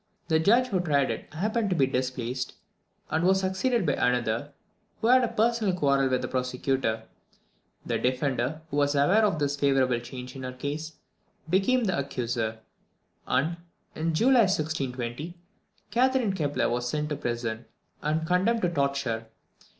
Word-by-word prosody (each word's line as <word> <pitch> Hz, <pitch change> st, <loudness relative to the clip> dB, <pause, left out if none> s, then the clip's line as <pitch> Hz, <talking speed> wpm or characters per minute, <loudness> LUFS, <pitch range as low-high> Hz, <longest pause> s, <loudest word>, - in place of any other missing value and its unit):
The 160 Hz, -1 st, +4 dB
judge 235 Hz, +9 st, +4 dB
who 190 Hz, -5 st, +1 dB
tried 145 Hz, -6 st, +2 dB
it -, -, -7 dB
happened 210 Hz, +6 st, -1 dB
to 185 Hz, -, +1 dB
be 140 Hz, -5 st, +4 dB
displaced, 130 Hz, -1 st, -3 dB, 0.6 s
and 160 Hz, -, +1 dB
was 190 Hz, +1 st, +4 dB
succeeded 190 Hz, +4 st, 0 dB
by -, -, +2 dB
another, 125 Hz, +2 st, 0 dB, 0.5 s
who -, -, -3 dB
had 255 Hz, 0 st, +6 dB
a -, -, +2 dB
personal 220 Hz, -4 st, +1 dB
quarrel 140 Hz, -5 st, +2 dB
with 130 Hz, -1 st, 0 dB
the -, -, -1 dB
prosecutor. 125 Hz, -3 st, -1 dB, 0.8 s
The -, -, -1 dB
defender, 130 Hz, +3 st, -1 dB
who 145 Hz, -, -2 dB
was 145 Hz, 0 st, +2 dB
aware 175 Hz, +11 st, +4 dB
of 200 Hz, -6 st, +2 dB
this 145 Hz, -1 st, 0 dB
favourable 135 Hz, -4 st, +2 dB
change 125 Hz, +1 st, -8 dB
in 135 Hz, -, -7 dB
her 130 Hz, 0 st, -5 dB
case, 150 Hz, +5 st, -4 dB, 0.6 s
became 240 Hz, +7 st, +3 dB
the 185 Hz, -8 st, 0 dB
accuser, 120 Hz, -5 st, -2 dB, 0.7 s
and, 155 Hz, +7 st, +1 dB, 0.4 s
in 160 Hz, 0 st, -1 dB
July 245 Hz, +4 st, +5 dB
1620, 150 Hz, -2 st, -3 dB, 0.5 s
Catherine 250 Hz, -2 st, +2 dB
Kepler 145 Hz, -6 st, 0 dB
was 120 Hz, +1 st, -1 dB
sent 150 Hz, +2 st, -2 dB
to 150 Hz, -, -1 dB
prison, 120 Hz, -3 st, -3 dB, 0.4 s
and 155 Hz, +2 st, 0 dB
condemned 190 Hz, +7 st, +2 dB
to 175 Hz, -, +3 dB
the -, -, -8 dB
torture. 140 Hz, -6 st, -1 dB
145 Hz, 160 wpm, -27 LUFS, 130-185 Hz, 0.8 s, had